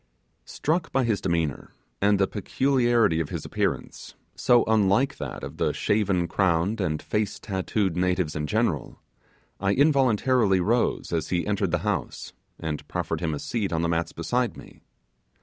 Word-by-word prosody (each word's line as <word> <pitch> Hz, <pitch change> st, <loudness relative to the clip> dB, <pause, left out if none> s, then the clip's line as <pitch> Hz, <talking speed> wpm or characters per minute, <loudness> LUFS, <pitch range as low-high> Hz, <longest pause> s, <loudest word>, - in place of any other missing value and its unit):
Struck 165 Hz, +3 st, -1 dB
by 135 Hz, -, +2 dB
his 115 Hz, -4 st, 0 dB
demeanour, 85 Hz, -5 st, -2 dB, 0.3 s
and 100 Hz, 0 st, +4 dB
the 95 Hz, -, +3 dB
peculiarity 120 Hz, -4 st, +1 dB
of 80 Hz, -, -2 dB
his -, -, -5 dB
appearance, -, -, -3 dB, 0.2 s
so 120 Hz, -1 st, +4 dB
unlike 110 Hz, +6 st, +2 dB
that -, -, -6 dB
of -, -, -7 dB
the -, -, +1 dB
shaven 100 Hz, -4 st, +1 dB
crowned 95 Hz, +4 st, +1 dB
and 80 Hz, -4 st, -1 dB
face 105 Hz, -1 st, -2 dB
tattooed 95 Hz, -2 st, -1 dB
natives 90 Hz, -3 st, 0 dB
in 75 Hz, -1 st, -2 dB
general, 105 Hz, -, -1 dB, 0.6 s
I 100 Hz, 0 st, +1 dB
involuntarily 130 Hz, -7 st, +3 dB
rose 115 Hz, 0 st, 0 dB
as 80 Hz, -2 st, -1 dB
he 85 Hz, -1 st, 0 dB
entered 100 Hz, -2 st, 0 dB
the 85 Hz, -, +1 dB
house, -, -, -3 dB, 0.3 s
and 75 Hz, -2 st, -4 dB
proffered -, -, -3 dB
him 80 Hz, -3 st, -1 dB
a -, -, -5 dB
seat 110 Hz, -5 st, -2 dB
on 80 Hz, 0 st, 0 dB
the 85 Hz, -, +1 dB
mats 85 Hz, 0 st, -1 dB
beside 120 Hz, +9 st, -1 dB
me. -, -, -14 dB
100 Hz, 160 wpm, -25 LUFS, 85-115 Hz, 0.6 s, and